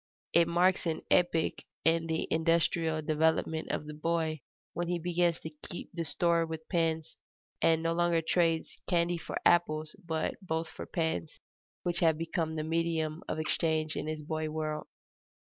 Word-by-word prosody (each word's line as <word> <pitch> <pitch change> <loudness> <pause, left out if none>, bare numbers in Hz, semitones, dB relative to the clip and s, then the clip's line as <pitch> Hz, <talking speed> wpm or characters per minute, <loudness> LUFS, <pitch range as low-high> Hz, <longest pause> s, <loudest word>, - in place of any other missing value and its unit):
It 170 -1 +6
marks 175 +1 +3
an 160 - -2
epoch 175 -2 +3 0.2
in 165 0 +3
the 160 0 -1
industrial 165 -1 +2
development 160 +1 +1
of - - -2
the 150 - -7
boy 160 -1 -1 0.3
when 175 +1 -2
he 175 0 0
begins 175 0 +1
to 160 - -6 0.2
keep 175 - -7
store 170 +2 +2
with 160 -1 -6
pins, 160 -2 0 0.5
and 160 0 +4
no 165 0 +1
longer 170 -1 +2
trades 165 -1 +1
candy 175 -1 +2
for - - -4
apples, 155 -3 +3
but 160 -2 -2
both 160 -3 -2
for - - -8
pins, 160 - -2 0.4
which 175 -1 -1
have 160 -2 +4
become 165 -1 -2
the 155 - -1
medium 165 -1 0
of - - -2
exchange 155 0 0
in - - -3
his 155 -1 -3
boy 155 0 -2
world. 155 -1 -3
160 Hz, 160 wpm, -31 LUFS, 155-170 Hz, 0.5 s, It